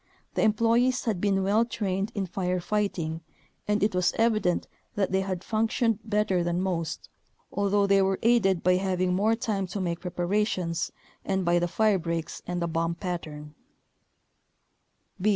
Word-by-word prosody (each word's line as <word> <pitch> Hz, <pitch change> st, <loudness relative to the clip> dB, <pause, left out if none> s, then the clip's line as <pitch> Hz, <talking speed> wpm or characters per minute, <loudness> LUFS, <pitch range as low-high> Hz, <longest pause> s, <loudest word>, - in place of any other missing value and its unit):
The -, -, 0 dB
em 215 Hz, -1 st, +4 dB
ployees 235 Hz, +4 st, +2 dB
had 210 Hz, -6 st, -1 dB
been 195 Hz, -2 st, +2 dB
well 205 Hz, +4 st, +3 dB
trained 200 Hz, -3 st, -2 dB
in 200 Hz, -2 st, -1 dB
fire 180 Hz, 0 st, -1 dB
fighting 175 Hz, -5 st, -2 dB, 0.5 s
and 210 Hz, -1 st, +1 dB
it 210 Hz, -, +2 dB
was 180 Hz, -1 st, +2 dB
evident 215 Hz, -6 st, +1 dB, 0.3 s
that 195 Hz, -3 st, 0 dB
they 190 Hz, 0 st, +2 dB
had 190 Hz, -1 st, -3 dB
functioned 225 Hz, 0 st, +1 dB
better 210 Hz, -4 st, +1 dB
than 175 Hz, 0 st, 0 dB
most, 175 Hz, -4 st, -2 dB, 0.4 s
although 200 Hz, +1 st, +2 dB
they 195 Hz, 0 st, +4 dB
were 190 Hz, 0 st, +1 dB
aided 210 Hz, -6 st, +3 dB
by 180 Hz, 0 st, +4 dB
having 185 Hz, -1 st, 0 dB
more 210 Hz, +5 st, +2 dB
time 215 Hz, -5 st, -2 dB
to 190 Hz, +3 st, -5 dB
make 175 Hz, -3 st, -2 dB
preparations 180 Hz, -1 st, -1 dB, 0.3 s
and 190 Hz, -1 st, -1 dB
by 175 Hz, 0 st, +3 dB
the 175 Hz, -, 0 dB
firebreaks 170 Hz, -5 st, 0 dB
and 175 Hz, -1 st, -2 dB
the -, -, 0 dB
bomb 165 Hz, 0 st, -1 dB
pattern. 155 Hz, -5 st, -6 dB
190 Hz, 155 wpm, -27 LUFS, 175-210 Hz, 0.5 s, em